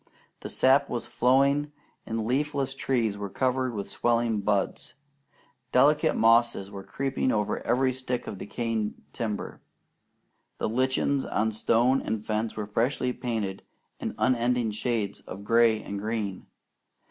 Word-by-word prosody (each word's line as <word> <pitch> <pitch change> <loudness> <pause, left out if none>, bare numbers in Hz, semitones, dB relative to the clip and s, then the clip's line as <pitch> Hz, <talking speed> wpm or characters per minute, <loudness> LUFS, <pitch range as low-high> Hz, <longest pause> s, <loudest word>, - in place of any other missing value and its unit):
The - - -7
sap 135 +2 +4
was 120 - -3
flowing, 140 +4 +2 0.4
and 110 -1 -2
leafless 135 +2 0
trees 120 -6 0
were 100 -1 -4
covered 130 +2 0
with 100 -1 -5
swelling 115 -2 +1
buds. 100 +4 -1 0.8
Delicate 145 +4 +4
mosses 115 -3 +3
were 100 -1 -7
creeping 135 +5 -1
over 105 -1 0
every 130 +2 +2
stick 125 -1 -3
of 100 - -6
decaying 110 0 -2 0.2
timber. 105 -3 -4 1.0
The - - -1
lichens 130 +4 +1
on 110 +1 0
stone 120 +4 +2
and 110 -1 -3
fence 110 +1 -2
were 105 - -2
freshly 125 +4 0
painted 110 -7 -3 0.4
in - - -4
unending 120 -2 +1
shades 110 -2 -2
of 100 +2 -8
gray 115 0 +4
and 100 0 -5
green. 105 -3 -3
115 Hz, 135 wpm, -27 LUFS, 105-130 Hz, 1.0 s, sap